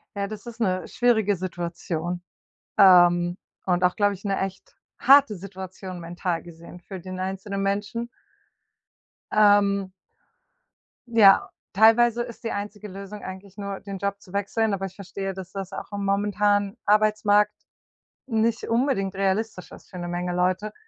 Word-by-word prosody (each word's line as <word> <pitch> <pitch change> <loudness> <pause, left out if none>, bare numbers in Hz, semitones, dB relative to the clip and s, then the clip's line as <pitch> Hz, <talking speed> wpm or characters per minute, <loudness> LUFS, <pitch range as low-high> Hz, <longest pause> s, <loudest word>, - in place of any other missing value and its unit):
Ja, 200 0 -2
das 210 +1 -8
ist 235 0 -9
'ne 185 -4 0
schwierige 220 -5 +2
Situation, 175 -1 -4 0.6
ähm, 175 -2 +6 0.3
und 180 0 +2
auch 180 - +3
glaube 205 -1 +2
ich 195 - -16
'ne 195 -1 -1
echt 190 0 -6 0.2
harte 275 -4 +6
Situation 185 -1 -8
mental 175 0 -3
gesehen 170 +1 -12
für 185 +2 -9
den 185 +1 -7
einzelnen 195 +1 -3
Menschen. 205 +4 -2 1.2
Ähm. 200 -2 +4 1.2
Ja, 215 -4 +6 0.2
teilweise 235 +3 +5
ist 235 -1 -11
die 230 - -2
einzige 210 +1 -5
Lösung 200 +2 -9
eigentlich 190 +1 -9
nur 200 -1 -5
den 195 -1 -7
Job 200 +1 -3
zu 185 - -16
wechseln, 205 +2 0
aber 195 0 -2
ich 190 0 -8
verstehe, 195 0 -5
dass 190 -1 -9
das 195 -2 -6
auch - - -7
am 200 -1 -3
momentanen 205 +1 +1
Arbeitsmarkt 210 0 +3 0.7
nicht 225 -1 0
unbedingt 230 -5 0
realistisch 195 0 -1
ist - - -14
für 180 - -9
'ne 175 0 -5
Menge 175 0 -2
Leute. 185 +4 0
200 Hz, 145 wpm, -25 LUFS, 185-210 Hz, 1.2 s, ähm